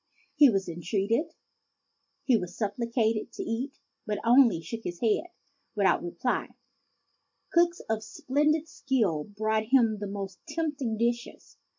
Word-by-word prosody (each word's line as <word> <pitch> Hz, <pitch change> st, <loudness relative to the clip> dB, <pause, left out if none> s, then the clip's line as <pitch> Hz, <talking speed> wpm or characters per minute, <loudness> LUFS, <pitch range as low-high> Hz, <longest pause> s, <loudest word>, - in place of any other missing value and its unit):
He 290 Hz, -2 st, +8 dB
was 195 Hz, -4 st, 0 dB
entreated, 200 Hz, -, -1 dB, 0.9 s
he 255 Hz, -, +4 dB
was 180 Hz, -4 st, -3 dB
supplicated, 225 Hz, 0 st, -1 dB
to -, -, -5 dB
eat; 250 Hz, +5 st, -3 dB, 0.3 s
but 210 Hz, -, 0 dB
he -, -, -7 dB
only 235 Hz, -5 st, +6 dB
shook 225 Hz, +8 st, -7 dB
his 175 Hz, -1 st, -5 dB
head 230 Hz, +9 st, +1 dB, 0.5 s
without 195 Hz, -3 st, +3 dB
replying. 175 Hz, +8 st, -2 dB, 1.0 s
Cooks 345 Hz, 0 st, +3 dB
of 220 Hz, -1 st, -2 dB
splen 300 Hz, -, +1 dB
did 320 Hz, 0 st, -3 dB
skill 225 Hz, -, 0 dB
brought 215 Hz, +1 st, -1 dB
him 230 Hz, -3 st, +3 dB
the 205 Hz, -, -4 dB
most 195 Hz, -1 st, -6 dB
tempting 285 Hz, -9 st, -2 dB
dishes. 235 Hz, +1 st, -2 dB
225 Hz, 135 wpm, -28 LUFS, 200-265 Hz, 1.0 s, He